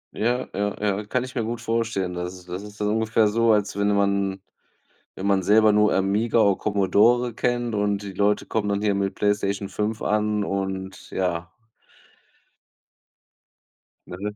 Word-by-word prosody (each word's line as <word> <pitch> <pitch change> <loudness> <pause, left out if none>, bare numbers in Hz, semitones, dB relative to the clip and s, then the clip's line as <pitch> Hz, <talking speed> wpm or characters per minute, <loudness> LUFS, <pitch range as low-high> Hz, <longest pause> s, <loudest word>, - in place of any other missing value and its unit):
Ja, 120 +3 0
ja, 105 0 -1
ja, 105 0 -1
kann 125 +2 0
ich 130 - -8
mir 120 - -1
gut 115 +1 -4
vorstellen. 110 -5 -1
Das 90 +1 -5
ist 90 -1 -14
das 90 +2 -5
ist 105 0 -12
dann 105 - 0
ungefähr 110 0 +2
so, 115 +2 +2
als 105 -2 +1
wenn 100 - +2
man 100 -1 0 0.7
wenn 95 - -5
man 100 -1 +2
selber 110 +2 +5
nur 105 0 +3
Amiga 100 +5 +1
o 100 -2 +4
Commodore 105 +5 +2
kennt 120 -1 -1
und 100 -1 0
die 100 -1 -7
Leute 105 +2 +1
kommen 105 -2 -2
dann 100 0 -1
hier 105 -2 +2
mit 100 0 -1
PlayStation 100 -1 -1
5 105 +1 -2
an 105 -1 0
und 95 -1 -4
ja. 85 -2 -2 2.6
Ne? 100 +4 -6
105 Hz, 165 wpm, -24 LUFS, 100-110 Hz, 2.6 s, selber